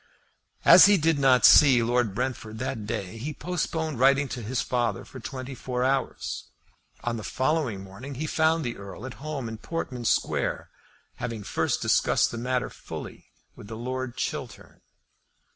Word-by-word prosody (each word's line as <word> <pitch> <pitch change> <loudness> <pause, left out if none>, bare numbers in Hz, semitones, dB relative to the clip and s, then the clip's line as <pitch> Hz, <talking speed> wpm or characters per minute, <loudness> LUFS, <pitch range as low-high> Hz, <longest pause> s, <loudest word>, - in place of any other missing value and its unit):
As - - +10
he 205 0 +6
did 160 -2 +2
not 130 -4 +5
see 130 -5 +7
Lord 120 -3 +1
Brentford 120 -3 -3
that 110 -3 -4
day 100 +1 -4
he 145 +5 -5
postponed 160 -5 -3
writing 140 +2 +4
to 125 - -5
his 120 +4 -2
father 120 -5 -1
for 130 - -11
twenty 130 +2 -6
four 125 -1 -3
hours. 135 0 -1 0.6
On 120 -1 -2
the 110 - -6
following 130 -8 -1
morning 115 +9 -9
he 150 +5 -3
found 160 0 +1
the 120 - -3
Earl 100 +4 -9
at 130 - -6
home 150 -5 -4
in 110 -1 -7
Portman 125 -5 -5
Square, - - 0 0.5
having 115 -3 -5
first - - -1
discussed - - +2
the 120 - -5
matter 125 +1 -1
fully - - -9 0.3
with 100 - -12
Lord 125 +2 -4
Chiltern. - - -5
125 Hz, 160 wpm, -26 LUFS, 115-140 Hz, 0.6 s, As